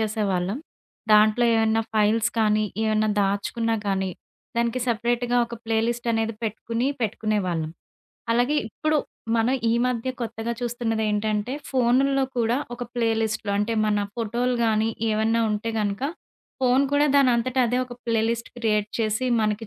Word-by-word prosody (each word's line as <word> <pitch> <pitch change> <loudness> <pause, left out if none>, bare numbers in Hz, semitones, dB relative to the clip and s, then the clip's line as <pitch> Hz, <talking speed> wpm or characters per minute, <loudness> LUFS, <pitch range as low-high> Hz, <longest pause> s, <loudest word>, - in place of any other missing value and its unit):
చేసేవాళ్ళం. 205 -1 -1 0.5
దాంట్లో 215 +3 +5
ఏమన్నా 225 0 +2
ఫైల్స్ 220 +2 +3
కానీ, 215 0 +3 0.2
ఏమన్నా 215 0 +2
దాచుకున్నా 215 +3 0
గానీ, 190 -1 0 0.5
దానికి 235 +2 0
సెపరేట్‌గా 240 +1 +1
ఒక 235 - -7
ప్లే 225 0 +1
లిస్ట్ 235 0 -2
అనేది 225 0 -1
పెట్టుకుని, 230 +3 -2
పెట్టుకునే 215 0 0
వాళ్ళం. 160 -3 -2 0.6
అలాగే 245 +6 +2
ఇప్పుడు 310 +6 0 0.4
మనం 230 +3 +2
ఈ - - +3
మధ్య 250 0 -1
కొత్తగా 230 0 -3
చూస్తున్నదేంటంటే 220 -2 -1 0.2
ఫోనుల్లో 265 +2 +3
కూడా 235 0 +2 0.2
ఒక 245 - -7
ప్లే 230 -2 +1
లిస్టులు 220 -1 -2
అంటే 210 +3 0
మన 210 -1 +2 0.2
ఫోటోలు 240 +2 -1
గానీ, 220 0 +2 0.2
ఏవన్నా 220 +2 +1
ఉంటే 210 +2 -2
కనుక. 205 0 -2 0.6
ఫోను 255 +1 +4
కూడా 290 +1 +4
దానంతట 255 -2 +3
అదే 245 +2 0
ఒక 245 -1 -10
ప్లే 230 -1 +2
లిస్ట్ 230 0 -3
క్రియేట్ 210 -3 +1
చేసి 220 +3 0
మనకి 215 +1 -1
225 Hz, 140 wpm, -24 LUFS, 215-240 Hz, 0.6 s, దాంట్లో